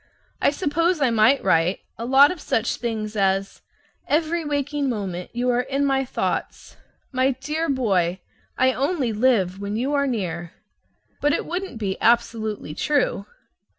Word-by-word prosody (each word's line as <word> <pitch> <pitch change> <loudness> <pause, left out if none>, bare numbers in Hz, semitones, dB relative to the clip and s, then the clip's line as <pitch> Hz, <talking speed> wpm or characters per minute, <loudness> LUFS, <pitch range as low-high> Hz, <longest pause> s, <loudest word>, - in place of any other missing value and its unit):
I - - +5
suppose 330 +3 0
I 265 -4 +2
might 230 +5 +4
write 175 0 +2
a 230 - -6
lot 270 +3 +6
of 360 -4 -7
such 225 +2 0
things 220 -2 -4
as: 195 -1 0 0.5
"Every 325 +2 +1
waking 290 -1 -1
moment 190 -6 -4
you 245 +1 0
are 245 0 +2
in 275 +2 -1
my 270 -1 +1
thoughts." - - -3 0.4
"My 260 0 +2
dear 310 +3 -2
boy, 190 -9 +1 0.4
I 260 0 +3
only 275 -3 0
live 210 -5 +2
when 200 +1 -4
you 260 +6 -1
are 280 -1 +2
near." 175 -8 -3 0.7
But 295 0 +3
it - - -1
wouldn't 360 -5 -4
be 195 -3 -3
absolutely 220 -7 +1
true. 270 - 0
250 Hz, 150 wpm, -23 LUFS, 205-285 Hz, 0.7 s, lot